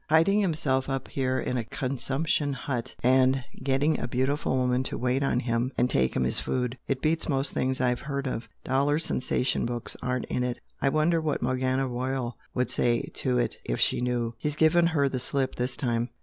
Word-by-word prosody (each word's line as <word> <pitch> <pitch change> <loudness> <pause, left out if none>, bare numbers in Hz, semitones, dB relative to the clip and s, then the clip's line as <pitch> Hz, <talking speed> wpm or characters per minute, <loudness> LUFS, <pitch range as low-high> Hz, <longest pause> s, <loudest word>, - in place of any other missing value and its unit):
Hiding 165 +7 +5
himself 145 -8 0
up 135 -1 -3
here 130 -1 0
in 125 - -1
a 120 - -1
consumption 140 +5 -1
hut, 125 -3 -4
and 130 +1 +4 0.2
getting 140 +3 +2
a - - -2
beautiful 130 +2 0
woman 125 0 +2
to - - -3
wait 125 +2 +1
on 135 -3 +2
him 120 +1 0
and 125 - +2
'take 65 -1 +2
him 65 - +2
his 65 - +2
food'! 125 -1 -1
It 135 -1 -1
beats 160 +1 +1
most 135 -1 0
things 130 0 0
I've 125 -1 +1
heard 140 -1 -3
of! 120 -3 -3
Dollar 140 +3 +2
sensation 130 -5 0
books 120 -1 -3
aren't 125 0 -1
in 125 - -1
it! 125 -1 -2 0.2
I 140 - +3
wonder 155 +3 +2
what 155 -2 -1
Morgana 130 +1 +1
Royal 125 0 -2 0.2
would 125 0 0
say 120 -1 +1
to 60 - +1
it, - - 0
if - - -2
she - - +2
knew! 120 -2 -1
He's 150 -1 -2
given 160 +2 +4
her 150 -4 +2
the 130 -1 -2
slip 130 +1 -1
this 125 +1 -2
time!" 120 -2 0
130 Hz, 200 wpm, -27 LUFS, 125-140 Hz, 0.2 s, Hiding